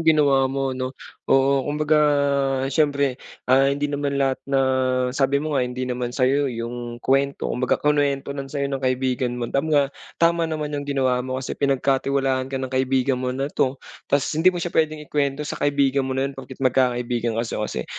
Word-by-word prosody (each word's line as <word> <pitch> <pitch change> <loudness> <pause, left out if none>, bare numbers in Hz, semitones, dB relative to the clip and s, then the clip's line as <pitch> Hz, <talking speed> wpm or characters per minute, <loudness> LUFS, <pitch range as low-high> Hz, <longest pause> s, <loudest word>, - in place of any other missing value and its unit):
ginawa 140 -4 +4
mo, 135 0 -1
'no? 130 +1 -4 0.3
Oo, 135 0 +4
kumbaga 150 +1 +2 0.7
siyempre, 140 -3 +1 0.2
ah, 135 +2 +4
hindi 140 +1 -1
naman 145 -1 -1
lahat 135 -1 0
na 135 - +2 0.5
sabi 135 0 +2
mo 150 +2 -2
nga, 135 - +2
hindi 125 +1 -2
naman 125 -1 -2
sa'yo 135 +2 +1
yung 120 0 -5
kwento 140 +1 +1
kumbaga 125 0 +1
kinwento 145 -2 +1
lang 135 -1 -6
sa'yo 140 0 -2
ng 135 - -2
kaibigan 130 -1 0
mo, 120 - -3
tam 140 +3 0
nga, 140 -2 +2 0.2
tama 170 -1 +2
naman 150 -2 -3
yung 145 -1 -4
ginawa 130 -3 +1
mo 130 +1 -4
kasi 130 0 -4
pinagkatiwalaan 135 -1 0
ka 135 - -4
ng 130 0 -4
kaibigan 130 0 +1
mo 130 - -2
na 135 +2 -2
'to 135 +1 0 0.3
tas 140 -1 +2
hindi 160 +4 +4
mo 180 - +1
siya 175 0 -3
pwedeng 155 -1 0
ikwento 145 0 -1
sa - - -5
kaibigan 140 -1 +2
mo 130 - -2
na 135 - +1
yun 140 - -6
porket 130 -1 -10
magkakaibigan 120 -2 +1
kayo 115 -1 -2
kasi, 65 - -4
135 Hz, 185 wpm, -23 LUFS, 130-145 Hz, 0.7 s, ginawa